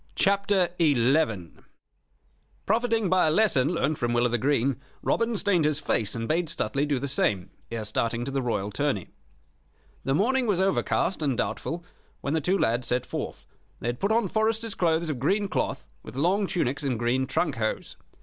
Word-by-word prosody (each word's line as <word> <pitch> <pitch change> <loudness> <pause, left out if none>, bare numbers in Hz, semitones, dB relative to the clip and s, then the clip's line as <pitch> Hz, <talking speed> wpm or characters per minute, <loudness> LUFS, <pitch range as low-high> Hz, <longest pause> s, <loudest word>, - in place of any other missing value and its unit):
CHAPTER 200 -2 +2
XI 130 - +2 1.2
Profiting 225 0 +1
by 185 -2 +3
a - - +4
lesson 155 -7 +3
learned 155 -3 0
from 120 0 0
Will 120 0 +3
o' 120 0 +1
th' - - 0
Green, 135 -1 +1 0.2
Robin 230 -1 +1
stained 195 -5 +2
his 150 -1 +1
face 110 -7 0
and 115 0 -3
bade 165 +2 +1
Stuteley 140 +1 0
do 145 -2 +1
the 140 +3 -3
same 100 -9 +1 0.2
ere 115 -2 -4
starting 115 +2 -1
to 135 - -4
the 135 0 -1
Royal 105 -5 -2
tourney. 130 -4 -1 0.9
The 135 - +1
morning 250 - +2
was 200 -4 +1
overcast 190 -1 +1
and 140 -5 0
doubtful 170 +1 -3 0.4
when 140 - -2
the 160 - +1
two 185 +6 +1
lads 120 -6 0
set 125 0 0
forth. - - -5 0.3
They 120 - -2
had 120 - -4
put 200 - 0
on 225 -2 +2
foresters' 220 +2 0
clothes 165 -1 +1
of 135 - -5
green 200 - +1
cloth, 70 - -2
with - - -11
long 185 +8 +2
tunics 140 -7 -1
and 135 -5 -1
green 120 +3 0
trunk 150 -2 0
hose. 110 -1 -2
145 Hz, 185 wpm, -26 LUFS, 120-190 Hz, 1.2 s, a